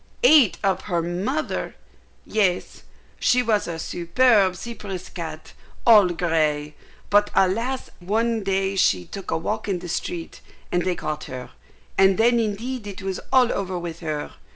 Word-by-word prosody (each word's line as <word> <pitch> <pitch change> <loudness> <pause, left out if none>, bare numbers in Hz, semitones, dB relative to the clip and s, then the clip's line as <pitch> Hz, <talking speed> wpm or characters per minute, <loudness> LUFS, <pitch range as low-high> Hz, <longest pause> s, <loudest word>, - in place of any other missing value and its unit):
"Ate 300 - +6
up 195 -1 +1
her 170 -2 0
mother!" 200 - -2 0.5
"Yes. 190 -5 0 0.4
She 250 0 +3
was 215 -3 +1
a 170 -1 -4
superb 190 +4 +2
Cyprus 200 -4 -7
cat, 160 -3 -7 0.3
all 215 -5 +8
grey; 155 -4 0 0.4
but, 205 0 +4
alas 230 +8 +1
I - - -15
one 225 +2 0
day 195 0 0
she 95 - +2
took 195 - -8
a - - +1
walk 215 +7 -3
in 195 -3 0
the 175 0 -8
street, 170 0 -4 0.3
and 175 - +1
they 185 -1 0
caught 155 -2 -4
her, 125 -1 -8 0.5
and 195 0 +5
then 235 +1 +4
indeed 225 +2 -3
it 195 -2 -8
was 190 -1 -3
all 255 -2 +4
over 185 -2 -3
with 170 -1 -6
her. 155 -3 -4
190 Hz, 155 wpm, -23 LUFS, 170-220 Hz, 0.5 s, all